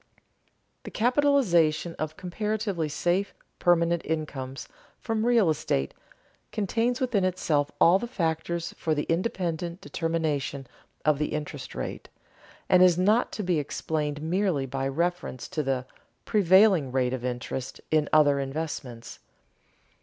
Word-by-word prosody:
_The - - -8
capitalization 215 - +2
of 155 0 -4
comparatively 200 -2 -2
safe 175 +6 0 0.2
permanent 170 -1 +3
incomes 140 -4 -4 0.3
from 225 -2 -1
real 235 -6 +4
estate 150 - 0 0.6
contains 230 +4 0
within 240 -7 +1
itself 160 -6 +1
all 175 +3 +6
the 240 - -4
factors 170 -3 -2
for 160 -1 0
the 150 - -1
independent 175 -1 -2
determination 155 -6 -2 0.4
of 150 -2 +3
the 150 - -1
interest 150 -2 -5
rate, - - -5 0.6
and 180 - +5
is 180 -2 +6
not 210 +6 +3
to 210 - -3
be 175 -4 +1
explained 150 0 -3
merely 175 -4 0
by 135 +1 -2
reference 170 -2 -2
to 165 -4 -1
"the 135 -3 -1 0.4
prevailing 190 -7 +4
rate 130 -1 +1
of 130 -2 -4
interest" 125 +1 -4
in 155 -2 +2
other 145 -2 +5
investments. 135 -4 -5
165 Hz, 125 wpm, -27 LUFS, 145-185 Hz, 0.6 s, all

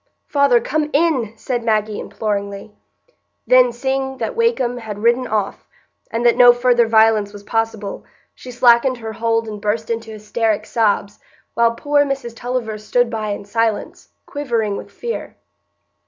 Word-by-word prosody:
"Father, 280 -4 +3
come 305 +4 -1
in!" 280 -8 +1
said 240 +1 -3
Maggie, 215 -2 0
imploringly. 200 -1 -4 0.7
Then, 255 -1 +5
seeing 265 +2 -2
that - - -3
Wakem 460 - +1
had 215 -3 -7
ridden 240 +2 +2
off, 210 -3 -3 0.4
and 230 +1 -2
that 240 - +5
no 245 -1 +8
further 240 -1 +3
violence 220 -2 +3
was 205 -1 -11
possible, 225 -2 -3 0.3
she 255 - -12
slackened 245 +1 +4
her 225 -1 -7
hold 225 0 0
and 210 -1 -7
burst 220 +2 -1
into 225 -1 -4
hysteric 215 0 -2
sobs, 205 -3 0 0.3
while 230 0 +2
poor 290 +4 +2
Mrs 270 -4 -4
Tulliver 235 -3 -3
stood 235 +3 0
by 215 -2 -3
in 205 0 -4
silence, 225 +1 -2 0.2
quivering 235 -8 -2
with - - -8
fear. 475 0 -6
230 Hz, 150 wpm, -19 LUFS, 215-250 Hz, 0.7 s, no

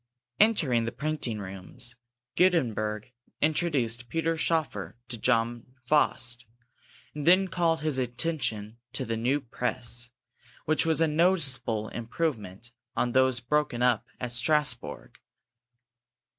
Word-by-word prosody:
Entering 150 - +3
the 115 - -2
printing 135 -3 -2
rooms, 95 +4 -4 0.4
Gutenberg 115 - +1 0.3
introduced 135 -7 0
Peter 165 0 0
Schoeffer 160 -6 -1
to 120 - -2
John 120 +1 0
Faust, 125 -4 +1 0.7
and 150 0 -5
then 185 +2 +6
called 165 -3 +1
his 150 -4 0
attention 120 -4 -2
to - - -3
the 115 - -2
new 125 +6 +1
press, 120 -2 -2 0.6
which 155 +1 +2
was 160 0 +3
a 165 - +4
noticeable 150 - +2
improvement 115 - -4 0.2
on 120 - 0
those 130 -1 +3
broken 125 -1 0
up 120 -1 +2
at 125 -1 -3
Strasbourg. 125 0 0
125 Hz, 115 wpm, -28 LUFS, 115-155 Hz, 0.7 s, then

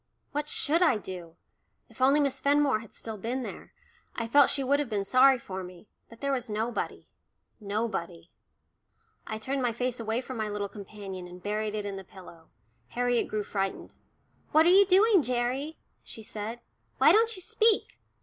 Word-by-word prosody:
What 295 +1 -3
should 320 +4 +2
I 320 -10 +4
do? 180 -5 -8 0.5
If - - -14
only 275 +3 +5
Miss 275 -2 0
Fenmore 280 -3 +3
had 225 -1 -13
still 220 -2 -6
been 245 +5 -3
there, - - -8 0.4
I 230 - -2
felt 280 +4 +5
she 275 - 0
would 280 +2 +2
have 290 -4 -2
been 205 -3 -1
sorry 260 +4 +6
for 190 -5 -7
me, 180 +2 -12 0.2
but 230 - -15
there 280 0 0
was 250 -3 -3
nobody 220 +3 -3 0.5
nobody. 200 -5 -4 1.0
I 220 - -4
turned 265 +5 -2
my 245 -2 0
face 250 +1 -2
away 225 +1 -1
from 260 -1 -7
my 215 -1 -2
little 205 -1 -3
companion, 195 -3 -8
and 180 +1 -12
buried 210 +1 -2
it 210 -1 -3
in 200 -1 -4
the 195 - -7
pillow. 175 -3 -15 0.4
Harriet 245 - 0
grew 215 -1 -2
frightened. 195 -1 -3 0.6
"What 315 +1 +5
are - - +6
you 390 +2 +7
doing, 390 0 +5
Gerry?" 255 +4 -2 0.2
she 220 - -10
said. 215 +3 -5 0.4
"Why - - +6
don't 455 +1 +3
you 370 - -8
speak? 440 +2 +1
230 Hz, 180 wpm, -28 LUFS, 205-275 Hz, 1.0 s, you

